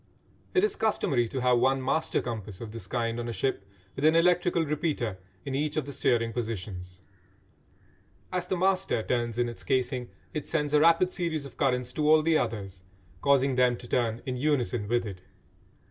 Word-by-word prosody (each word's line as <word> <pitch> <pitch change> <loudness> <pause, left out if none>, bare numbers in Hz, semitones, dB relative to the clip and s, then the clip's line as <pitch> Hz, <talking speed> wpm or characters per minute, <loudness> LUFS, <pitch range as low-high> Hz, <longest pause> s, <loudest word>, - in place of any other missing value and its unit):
It 370 - +4
is 425 - +2
customary 135 - +1
to 130 +3 -4
have 125 -1 +4
one 135 +2 +3
"master 130 +5 0
compass" 110 -5 -5
of 115 -2 -7
this 110 -5 -8
kind 115 +1 -1
on 120 0 -3
a - - -2
ship, 125 -2 -1 0.3
with 135 - -5
an 155 +1 +5
electrical 175 0 +3
repeater 145 - -2 0.3
in 135 - -4
each 150 +2 -1
of 155 - 0
the 140 - -7
steering 115 -2 +1
positions. 95 -5 -5 1.3
As 180 -1 -2
the 185 - -1
"master" 185 - +1
turns 120 -1 -1
in 120 0 +2
its 120 - -7
casing 125 -1 -1 0.2
it 150 - -4
sends 150 -3 -1
a 150 - +6
rapid 170 +3 +4
series 160 -5 -2
of 140 - -11
currents 125 -3 0
to 150 -1 +1
all 155 0 +6
the 165 0 +3
others, 100 -9 -2 0.4
causing 140 -1 +3
them 125 -1 +3
to 120 - -9
turn 115 -2 0
in 130 -1 -3
unison 125 -6 0
with 120 +1 +1
it. 95 -3 -7
125 Hz, 190 wpm, -28 LUFS, 115-155 Hz, 1.3 s, a